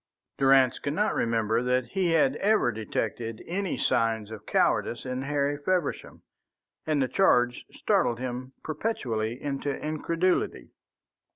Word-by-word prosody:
Durrance 135 -2 +4
could 145 - -3
not 210 +3 +1
remember 115 0 +1
that 125 0 +1
he 185 +2 0
had 145 -4 +3
ever 205 - +2
detected 115 +1 -4
any 190 +1 -2
signs 110 -2 0
of 110 - -9
cowardice 120 - +1
in 130 0 -3
Harry 145 +1 -1
Feversham, 185 +2 -2 0.6
and 155 -2 +1
the - - 0
charge 125 -8 +2
startled 120 - +1
him 130 +1 -5
perpetually 125 - -2
into 140 0 -3
incredulity. 155 - -1
130 Hz, 125 wpm, -27 LUFS, 115-155 Hz, 0.6 s, Durrance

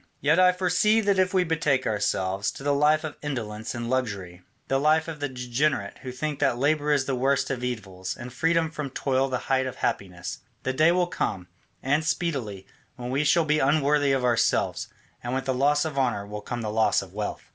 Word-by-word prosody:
"Yet 150 +5 +3
I 180 0 +7
foresee 185 +4 +2
that 200 -2 +2
if 185 -1 +3
we 185 -1 +3
betake 155 -5 +1
ourselves 100 -2 0
to - - -10
the 145 0 +2
life 150 +2 +3
of 155 -2 -6
indolence 110 -7 -4
and 120 0 -4
luxury, 100 -9 -3 0.3
the 135 - +1
life 155 +3 +3
of 160 -2 -6
the 145 -1 -2
degenerate 125 -3 -1
who 130 - -7
think 145 +3 -4
that 135 -4 +2
labour 150 +2 +1
is 140 -2 +2
the 135 - -1
worst 135 +2 +1
of 125 -2 -3
evils 95 -7 -4
and 120 0 -8
freedom 165 +3 +1
from 150 -3 -4
toil 135 0 0
the 130 - 0
height 130 -1 +1
of 130 - -5
happiness, 90 -2 -3 0.2
the 130 - -1
day 155 +5 +4
will 180 0 +2
come, 95 - -3 0.3
and 145 +4 +2
speedily, 135 - -2 0.3
when 125 -1 -6
we 140 +3 +1
shall 155 +3 +3
be 150 0 +2
unworthy 145 0 +3
of 135 -2 +1
ourselves, 120 -1 +1 0.4
and 120 +2 -2
with 130 - -2
the 130 - 0
loss 145 +4 +2
of 150 -3 -2
honour 120 -6 0
will 105 +1 -7
come 120 +3 -5
the 105 - -2
loss 110 -2 +2
of 95 -1 -14
wealth. 105 0 -4
135 Hz, 210 wpm, -26 LUFS, 120-150 Hz, 0.4 s, I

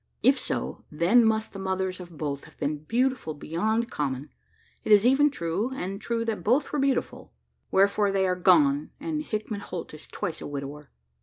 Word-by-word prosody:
If - - +5
so, - - -3
then 175 +11 +4
must 220 0 +1
the 195 - -7
mothers 190 -1 -2
of 175 -3 -10
both 140 -2 -3
have - - -17
been 150 +1 -2
beautiful 250 - 0
beyond 220 +10 -1
common! 140 -1 -3 0.5
It - - -2
is 210 +1 +7
even 275 +4 +5
true, 200 - -2
and 195 -2 -4
true 230 -1 -1
that 225 -2 -2
both 250 +9 +2
were 295 - +1
beautiful 275 -1 -1 0.4
were 195 +1 +5
for 200 0 +1
they 195 -1 +2
are 180 -1 +1
gone, 155 -6 +4
and 310 0 -2
Hickman 215 -6 -4
Holt 180 -5 -7
is 155 - -10
twice 165 - -4
a - - -5
widower. 145 +1 -6
195 Hz, 185 wpm, -27 LUFS, 155-230 Hz, 0.5 s, is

